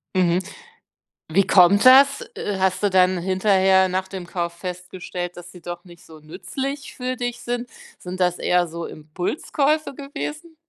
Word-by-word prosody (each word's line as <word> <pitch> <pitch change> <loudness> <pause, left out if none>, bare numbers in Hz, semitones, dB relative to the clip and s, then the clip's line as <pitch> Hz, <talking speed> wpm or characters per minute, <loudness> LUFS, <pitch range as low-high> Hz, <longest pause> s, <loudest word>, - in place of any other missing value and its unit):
Mhm. 180 -1 +3 0.9
Wie 190 +5 +2
kommt 195 +4 +5
das? 275 +2 +7
Äh, 200 -2 -3
hast 190 +1 0
du 205 - +3
dann 185 0 +4
hinterher 190 +1 +3
nach 185 +1 -2
dem 190 -2 -8
Kauf 170 -2 -3
festgestellt, 180 0 -6
dass 175 0 -11
sie 180 - -14
doch 175 +1 -7
nicht 175 -2 -16
so 160 -1 -14
nützlich 270 - -6
für 255 0 -3
dich 245 -1 -4
sind? 245 0 -3 0.3
Sind 180 +1 -8
das 180 -1 +1
eher 180 -1 +1
so 170 +1 -6
Impulskäufe 275 - -2
gewesen? 300 +4 -7
185 Hz, 155 wpm, -22 LUFS, 175-245 Hz, 0.9 s, das